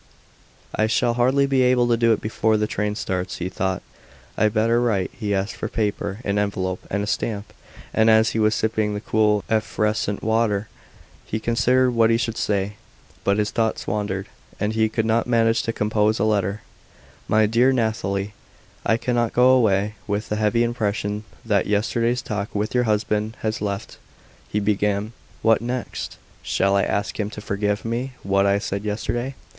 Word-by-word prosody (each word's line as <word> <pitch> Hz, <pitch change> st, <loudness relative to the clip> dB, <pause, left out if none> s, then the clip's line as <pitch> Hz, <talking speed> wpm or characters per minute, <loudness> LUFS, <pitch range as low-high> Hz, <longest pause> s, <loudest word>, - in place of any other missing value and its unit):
"I 110 Hz, -, +1 dB
shall 120 Hz, +1 st, +2 dB
hardly 130 Hz, +4 st, +3 dB
be 135 Hz, -1 st, +2 dB
able 125 Hz, -1 st, +4 dB
to 120 Hz, -, +4 dB
do 115 Hz, 0 st, +3 dB
it 110 Hz, -, +1 dB
before 110 Hz, 0 st, +1 dB
the 105 Hz, -, +1 dB
train 105 Hz, 0 st, -2 dB
starts," 95 Hz, -3 st, -3 dB
he 90 Hz, -, -3 dB
thought; 95 Hz, 0 st, -2 dB, 0.5 s
"I'd 110 Hz, 0 st, +2 dB
better 115 Hz, +2 st, +3 dB
write." 105 Hz, -6 st, 0 dB
He 105 Hz, -3 st, -4 dB
asked 100 Hz, 0 st, -1 dB
for -, -, -4 dB
paper, 100 Hz, -2 st, -2 dB
an 100 Hz, 0 st, +1 dB
envelope, 95 Hz, -2 st, -2 dB
and 100 Hz, +1 st, -1 dB
a -, -, -1 dB
stamp, 105 Hz, -1 st, -3 dB, 0.4 s
and 110 Hz, 0 st, +4 dB
as 110 Hz, 0 st, +5 dB
he 110 Hz, -, -1 dB
was 110 Hz, 0 st, +3 dB
sipping 110 Hz, -1 st, 0 dB
the -, -, -2 dB
cool, 105 Hz, -1 st, +2 dB
effervescent 105 Hz, -1 st, 0 dB
water 110 Hz, -2 st, +1 dB, 0.6 s
he 110 Hz, -, -2 dB
considered 125 Hz, +3 st, +2 dB
what 115 Hz, -2 st, +3 dB
he 115 Hz, -, +4 dB
should 115 Hz, -1 st, -2 dB
say. 100 Hz, -1 st, -1 dB, 0.5 s
But 100 Hz, +1 st, +2 dB
his 105 Hz, 0 st, 0 dB
thoughts 115 Hz, -2 st, -1 dB
wandered, 100 Hz, -2 st, -2 dB, 0.3 s
and 105 Hz, +1 st, 0 dB
he 110 Hz, 0 st, +2 dB
could 110 Hz, 0 st, -1 dB
not 115 Hz, +1 st, +1 dB
manage 115 Hz, -1 st, +3 dB
to 115 Hz, -, -2 dB
compose 105 Hz, 0 st, +1 dB
a -, -, 0 dB
letter. 105 Hz, -1 st, 0 dB, 0.7 s
"My 110 Hz, 0 st, +4 dB
dear 120 Hz, +5 st, +3 dB
Nathalie, 105 Hz, -5 st, -1 dB, 0.5 s
I 115 Hz, -, +2 dB
cannot 120 Hz, -1 st, 0 dB
go 125 Hz, +1 st, +5 dB
away 105 Hz, -5 st, +3 dB
with 105 Hz, +1 st, -2 dB
the 105 Hz, -, 0 dB
heavy 110 Hz, +2 st, +2 dB
impression 105 Hz, -3 st, -2 dB, 0.2 s
that 105 Hz, -4 st, +1 dB
yesterday's 115 Hz, +4 st, +1 dB
talk 105 Hz, -1 st, -4 dB
with 105 Hz, +2 st, -1 dB
your 125 Hz, -1 st, +2 dB
husband 105 Hz, 0 st, 0 dB
has 110 Hz, 0 st, -2 dB
left," 100 Hz, -1 st, -4 dB, 0.5 s
he 105 Hz, -, 0 dB
began. 105 Hz, +1 st, 0 dB, 0.3 s
"What 115 Hz, -1 st, +4 dB
next? 125 Hz, +1 st, -4 dB, 0.2 s
Shall 100 Hz, 0 st, +1 dB
I 100 Hz, -, +4 dB
ask 100 Hz, +2 st, -2 dB
him 105 Hz, -1 st, -1 dB
to 105 Hz, -, -8 dB
forgive 105 Hz, +1 st, -2 dB
me 120 Hz, +3 st, -2 dB
what 100 Hz, +1 st, +2 dB
I 100 Hz, 0 st, +3 dB
said 100 Hz, -1 st, -3 dB
yesterday? 120 Hz, +5 st, -2 dB
110 Hz, 180 wpm, -23 LUFS, 100-115 Hz, 0.7 s, as